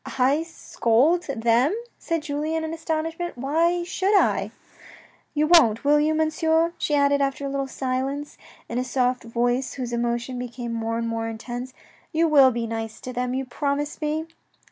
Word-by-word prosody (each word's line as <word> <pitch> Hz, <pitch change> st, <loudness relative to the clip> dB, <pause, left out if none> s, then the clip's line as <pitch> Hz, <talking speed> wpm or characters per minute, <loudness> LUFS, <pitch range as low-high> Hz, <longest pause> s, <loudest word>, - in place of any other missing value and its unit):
"I 270 Hz, +4 st, +3 dB
scold 325 Hz, 0 st, +1 dB
them!" 240 Hz, -, +2 dB, 0.2 s
said 330 Hz, -2 st, -2 dB
Julien 310 Hz, +2 st, -2 dB
in 320 Hz, 0 st, -4 dB
astonishment; 325 Hz, 0 st, -3 dB
"why 330 Hz, +7 st, +1 dB
should 380 Hz, +3 st, 0 dB
I?" -, -, +1 dB, 0.9 s
"You 300 Hz, +1 st, +3 dB
won't, 250 Hz, -10 st, +5 dB
will 295 Hz, +1 st, +4 dB
you, 310 Hz, +1 st, +2 dB
Monsieur," 320 Hz, +1 st, +2 dB
she 295 Hz, -, 0 dB
added 280 Hz, 0 st, +3 dB
after 275 Hz, 0 st, -1 dB
a -, -, -2 dB
little 275 Hz, 0 st, -2 dB
silence, 270 Hz, +2 st, -3 dB, 0.3 s
in 235 Hz, -, -2 dB
a -, -, 0 dB
soft 255 Hz, 0 st, 0 dB
voice 245 Hz, +3 st, 0 dB
whose 250 Hz, -3 st, -5 dB
emotion 240 Hz, +1 st, -2 dB
became 240 Hz, -1 st, -5 dB
more 230 Hz, 0 st, -2 dB
and 230 Hz, 0 st, -2 dB
more 225 Hz, 0 st, -2 dB
intense. 240 Hz, +3 st, -6 dB, 0.2 s
" -, -, -31 dB
You 330 Hz, +1 st, +3 dB
will 280 Hz, -4 st, +7 dB
be 235 Hz, -2 st, -2 dB
nice 225 Hz, -1 st, -5 dB
to 255 Hz, -, -6 dB
them, 250 Hz, +1 st, -2 dB
you 265 Hz, 0 st, -2 dB
promise 290 Hz, +5 st, -2 dB
me 305 Hz, +1 st, -1 dB
275 Hz, 170 wpm, -24 LUFS, 240-315 Hz, 0.9 s, will